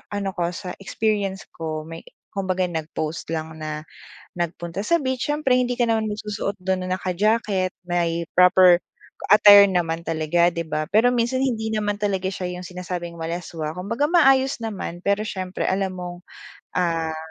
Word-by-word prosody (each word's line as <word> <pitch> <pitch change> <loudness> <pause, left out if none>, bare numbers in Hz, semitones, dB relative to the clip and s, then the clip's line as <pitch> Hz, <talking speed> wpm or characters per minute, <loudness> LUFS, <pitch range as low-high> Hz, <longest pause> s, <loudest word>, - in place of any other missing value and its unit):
ano 200 -1 -2
ko, 175 -2 0
sa 180 -2 -6
experience 200 -1 -1
ko, 155 -1 -5
may 165 +1 -9 0.3
kumbaga 185 -2 0
nag-post 160 0 -4
lang 160 0 -4
na 155 -1 -5 0.5
nagpunta 170 +1 -4
sa 340 +11 +2
beach. 260 -4 -2
Siyempre 295 -3 +1
hindi 250 -1 +2
ka 245 - +2
naman 225 -2 +1
magsusuot 210 -1 -4
do'n 185 -1 -2
na 185 - 0
naka-jacket. 190 0 0
May 170 -1 0
proper 180 -1 +6 0.5
attire 205 -1 +9
naman 170 -3 0
talaga, 165 +1 +1
'di 170 -1 -3
ba? 155 -1 -3
Pero 225 +5 +4
minsan, 250 +2 +1
hindi 220 -4 -1
naman 210 -1 -1
talaga 195 -2 0
siya 185 -1 -4
'yong 180 - -8
sinasabing 180 -2 -6
malaswa, 165 -2 -4
kumbaga 230 +10 -1
maayos 270 -5 +4
naman. 190 -5 -5
Pero 200 +1 +2
siyempre 185 -2 -3
alam 190 0 0
mong, 175 -1 -6 0.6
ah 165 -2 0
185 Hz, 155 wpm, -23 LUFS, 170-215 Hz, 0.6 s, attire